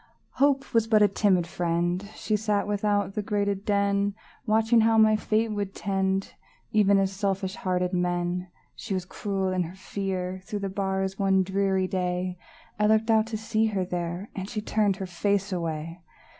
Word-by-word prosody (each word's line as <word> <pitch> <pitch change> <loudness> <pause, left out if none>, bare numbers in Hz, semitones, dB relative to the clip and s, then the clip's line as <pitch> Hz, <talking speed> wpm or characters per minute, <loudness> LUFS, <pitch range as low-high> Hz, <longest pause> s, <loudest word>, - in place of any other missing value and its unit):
Hope 275 -1 +2
Was 225 -1 +3
but 215 -2 +5
a - - +7
timid 195 -3 +2
friend; 175 +3 -1
She 215 - -1
sat 210 -1 0
without 205 -1 0
the 210 - -1
grated 200 -1 -1
den, 200 0 +1 0.3
Watching 225 +2 +4
how 225 0 +4
my 215 0 +6
fate 220 +1 0
would 200 -2 -3
tend, 195 -1 -1 0.4
Even 205 -2 +4
as 195 -1 +2
selfish 195 -1 -1
hearted 180 -4 -1
men. 175 0 -1 0.3
She 210 -5 -4
was 185 -1 -3
cruel 195 0 -2
in 185 - +1
her 175 +1 -5
fear; 185 -1 -4
Through 205 -1 -4
the 195 - -2
bars 190 0 -2
one 190 -1 +3
dreary 190 0 +1
day, 180 -1 -2 0.4
I 210 - +4
looked 220 +1 +3
out 220 0 +3
to 225 -1 -3
see 220 0 0
her 195 -4 -1
there, 175 +2 -4
And 195 0 -5
she 220 - -3
turned 210 -2 +1
her 195 0 -5
face 195 +2 -1
away! 165 0 -4
195 Hz, 175 wpm, -26 LUFS, 185-210 Hz, 0.4 s, a